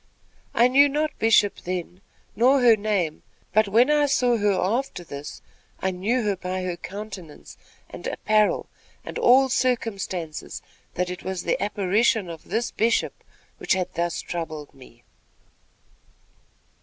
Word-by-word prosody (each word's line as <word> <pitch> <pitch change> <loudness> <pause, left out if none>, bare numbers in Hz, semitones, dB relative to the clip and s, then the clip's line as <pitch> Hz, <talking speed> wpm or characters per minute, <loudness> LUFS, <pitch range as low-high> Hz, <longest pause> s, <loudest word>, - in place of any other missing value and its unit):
I 235 - +6
knew 280 +3 +5
not 300 +2 0
Bishop 215 -2 +4
then, 180 +1 -5 0.3
nor 260 +5 +4
her 240 -3 +6
name; 200 -7 -1 0.3
but 215 +1 +4
when 235 +8 +4
I 295 -1 +3
saw 250 -3 +2
her 205 -1 +2
after 200 +1 -1
this, 145 -2 -9 0.4
I 190 - 0
knew 215 +7 -1
her 205 -2 0
by 185 0 -4
her 180 -1 -2
countenance 185 -2 -9 0.3
and - - -8
apparel 215 -1 +1 0.4
and - - -5
all 265 +2 +6
circumstances, 200 - -2 0.3
that 180 0 -1
it 180 - -7
was 190 -2 -4
the - - -1
apparition 205 -1 +1
of 165 - -11
this 235 +2 -2
Bishop, 225 +1 0 0.4
which - - +1
had 185 -1 -2
thus 170 0 -2
troubled 155 -4 -6
me." 125 -3 -17
200 Hz, 140 wpm, -24 LUFS, 180-235 Hz, 0.4 s, I